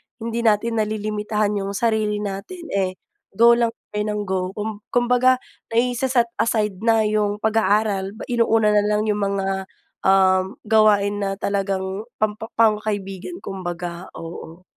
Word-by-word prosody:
hindi 230 Hz, 0 st, -4 dB
natin 225 Hz, 0 st, +2 dB
nalilimitahan 210 Hz, -1 st, -1 dB
'yung 195 Hz, 0 st, -4 dB
sarili 215 Hz, -2 st, 0 dB
natin, 260 Hz, -, -6 dB
eh, 190 Hz, -2 st, 0 dB, 0.4 s
go 235 Hz, +2 st, +7 dB
lang 235 Hz, 0 st, +3 dB, 0.2 s
tayo 210 Hz, 0 st, -1 dB
ng 210 Hz, 0 st, -1 dB
go. 190 Hz, -1 st, -1 dB
Kum 210 Hz, 0 st, -4 dB
kumbaga 250 Hz, +1 st, +3 dB, 0.4 s
naise-set 245 Hz, 0 st, +2 dB
aside 210 Hz, -4 st, 0 dB
na 225 Hz, -1 st, +3 dB
'yung 210 Hz, -1 st, +1 dB
pag 220 Hz, 0 st, +3 dB
aaral, 205 Hz, -1 st, +1 dB, 0.2 s
inuuna 225 Hz, -2 st, +3 dB
nalang 210 Hz, 0 st, +2 dB
'yung 210 Hz, -, -1 dB
mga, 195 Hz, -1 st, -1 dB, 0.4 s
um, 190 Hz, 0 st, +4 dB
gawain 210 Hz, -2 st, +3 dB
na 195 Hz, -1 st, -1 dB
talagang 195 Hz, +1 st, -2 dB
pampa 215 Hz, +1 st, -2 dB
pang 220 Hz, -2 st, +4 dB
kaibigan 205 Hz, -, -4 dB
kumbaga, 175 Hz, -1 st, -5 dB
oo. 165 Hz, +1 st, -9 dB
210 Hz, 135 wpm, -22 LUFS, 195-225 Hz, 0.4 s, go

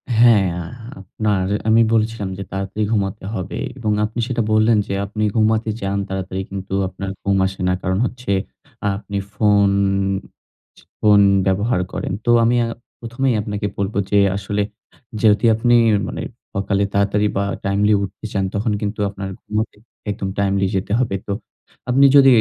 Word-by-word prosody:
হ্যাঁ, 110 Hz, -5 st, +5 dB, 0.5 s
আপনার 100 Hz, 0 st, -1 dB, 0.3 s
আমি 115 Hz, +1 st, +5 dB
বলেছিলাম 110 Hz, -2 st, 0 dB
যে 100 Hz, -, -4 dB
তাড়াতাড়ি 95 Hz, +2 st, -3 dB
ঘুমাতে 100 Hz, -4 st, -1 dB
হবে 95 Hz, -5 st, -4 dB, 0.2 s
এবং 110 Hz, -4 st, -1 dB
আপনি 110 Hz, +3 st, -5 dB
সেটা 125 Hz, -2 st, -1 dB
বললেন 110 Hz, +1 st, +4 dB
যে -, -, -3 dB
আপনি 105 Hz, +2 st, -3 dB
ঘুমাতে 110 Hz, 0 st, +2 dB
যান 100 Hz, +1 st, -1 dB
তাড়াতাড়ি 95 Hz, 0 st, -3 dB
কিন্তু 95 Hz, 0 st, -6 dB
আপনার 95 Hz, +1 st, -6 dB
ঘুম 100 Hz, -1 st, +2 dB
আসে 95 Hz, 0 st, -7 dB
না। 90 Hz, -, +2 dB
কারণ 95 Hz, +1 st, 0 dB
হচ্ছে 125 Hz, -5 st, -4 dB, 0.5 s
আ -, -, +3 dB
আপনি 100 Hz, 0 st, -5 dB, 0.2 s
ফোন, 100 Hz, -1 st, +3 dB, 1.3 s
ফোন 105 Hz, -1 st, +5 dB, 0.3 s
ব্যবহার 95 Hz, +1 st, +1 dB
করেন। -, -, -3 dB
তো 120 Hz, -, +4 dB
আমি 120 Hz, +2 st, +3 dB
আ -, -, -3 dB, 0.3 s
প্রথমেই 120 Hz, +2 st, -1 dB
আপনাকে 105 Hz, 0 st, -3 dB
বলব, 100 Hz, +1 st, -2 dB, 0.2 s
যে 100 Hz, -, +5 dB, 0.2 s
আসলে 100 Hz, +1 st, -2 dB, 0.6 s
যেহেতু 105 Hz, -1 st, +4 dB
আপনি 120 Hz, +2 st, +3 dB, 0.3 s
মানে -, -, -5 dB, 0.4 s
অকালে 100 Hz, 0 st, +1 dB
তাড়াতাড়ি 100 Hz, +1 st, +2 dB
বা 100 Hz, -, +1 dB, 0.2 s
টাইমলি 100 Hz, +2 st, +2 dB
উঠতে 100 Hz, +3 st, -7 dB
চান 95 Hz, -1 st, 0 dB
তখন 105 Hz, +2 st, 0 dB
কিন্তু 105 Hz, +1 st, -3 dB
আপনার 100 Hz, -1 st, -6 dB
ঘুমাতে 110 Hz, +1 st, -3 dB, 0.4 s
একদম 95 Hz, -1 st, -4 dB
টাইমলি 100 Hz, -1 st, +1 dB
যেতে 95 Hz, +1 st, -2 dB
হবে। 120 Hz, -6 st, 0 dB
তো 100 Hz, -, -1 dB, 0.6 s
আপনি 135 Hz, +3 st, +5 dB
যদি 135 Hz, -1 st, +8 dB
105 Hz, 155 wpm, -20 LUFS, 100-110 Hz, 1.3 s, যদি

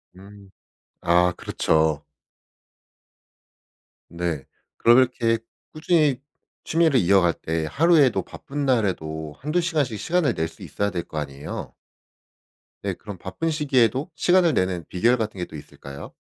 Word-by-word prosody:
음. 100 Hz, +1 st, -15 dB, 0.5 s
아 90 Hz, +1 st, +3 dB
그렇죠. 80 Hz, -2 st, 0 dB, 2.0 s
네. 85 Hz, -4 st, -3 dB, 0.3 s
그럼 120 Hz, +1 st, +6 dB
이렇게 120 Hz, -3 st, +2 dB, 0.4 s
꾸준히 155 Hz, -4 st, +2 dB, 0.4 s
취미를 160 Hz, -5 st, +3 dB
이어갈 90 Hz, -3 st, +4 dB
때 80 Hz, 0 st, -3 dB
하루에도 145 Hz, -, +4 dB
바쁜 145 Hz, +1 st, -6 dB
날에도 80 Hz, -, -1 dB
1-2 155 Hz, +6 st, 0 dB
시간씩 150 Hz, -, -1 dB
시간을 170 Hz, -7 st, +1 dB
낼 80 Hz, 0 st, -1 dB
수 80 Hz, -, -17 dB
있어야 100 Hz, 0 st, -2 dB
될 85 Hz, -2 st, -3 dB
거 80 Hz, -, -9 dB
아니에요? 70 Hz, -1 st, -6 dB, 1.1 s
네. -, -, -1 dB
그럼 105 Hz, -3 st, -9 dB
바쁜 95 Hz, -, -3 dB
시기에도 135 Hz, -2 st, +1 dB
시간을 175 Hz, -1 st, +3 dB
내는 90 Hz, -2 st, 0 dB
비결 115 Hz, +7 st, +3 dB
같은 110 Hz, -3 st, -3 dB
게 90 Hz, -, -2 dB
또 80 Hz, -, -12 dB
있을까요? 70 Hz, -1 st, -10 dB
105 Hz, 260 characters per minute, -24 LUFS, 85-145 Hz, 2.0 s, 그럼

